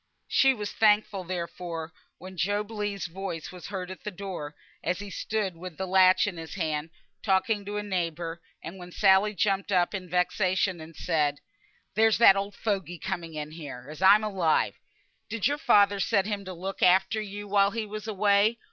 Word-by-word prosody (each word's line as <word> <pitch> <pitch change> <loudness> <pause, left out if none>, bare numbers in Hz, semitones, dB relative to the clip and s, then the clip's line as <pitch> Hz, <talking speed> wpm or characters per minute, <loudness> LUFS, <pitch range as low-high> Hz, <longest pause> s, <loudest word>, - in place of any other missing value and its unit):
She 270 - +4
was 210 -2 -5
thankful, 210 -3 +2
therefore, 170 -2 -5 0.2
when 185 +2 -10
Job 205 +5 -1
Legh's 205 -2 -3
voice 175 -2 -5
was 180 -2 -9
heard 185 -2 -5
at 185 - -10
the - - -3
door, 180 -6 -6 0.3
as 180 +1 0
he 205 0 -8
stood 205 -2 -2
with 175 -1 -9
the 190 - -2
latch 185 0 +5
in 195 -4 -4
his 160 +2 -8
hand, 160 -3 -2 0.3
talking 205 +1 +1
to 205 +1 -4
a 210 - -2
neighbour, 170 -3 -3 0.2
and 185 +3 -8
when 180 0 -10
Sally 195 +2 +4
jumped 200 0 0
up 180 -1 +2
in 185 -3 -5
vexation 180 0 +1
and 160 0 -11
said, 150 -4 0 0.5
"There's 220 +2 +4
that 230 -4 +8
old 200 +1 -3
fogey 190 -6 -2
coming 170 -1 -5
in 150 0 -5
here, 145 -5 -9
as 155 - -10
I'm 200 +3 +7
alive! 190 -7 +1 0.5
Did 230 -3 -2
your 290 +2 +1
father 200 -4 +4
set 195 0 +2
him 205 -1 -3
to 185 - -6
look 190 +3 -6
after 190 +4 +4
you 205 0 -7
while 200 0 +4
he 225 +1 -3
was 215 +1 -7
away? 205 +2 +3
190 Hz, 185 wpm, -27 LUFS, 175-205 Hz, 0.5 s, that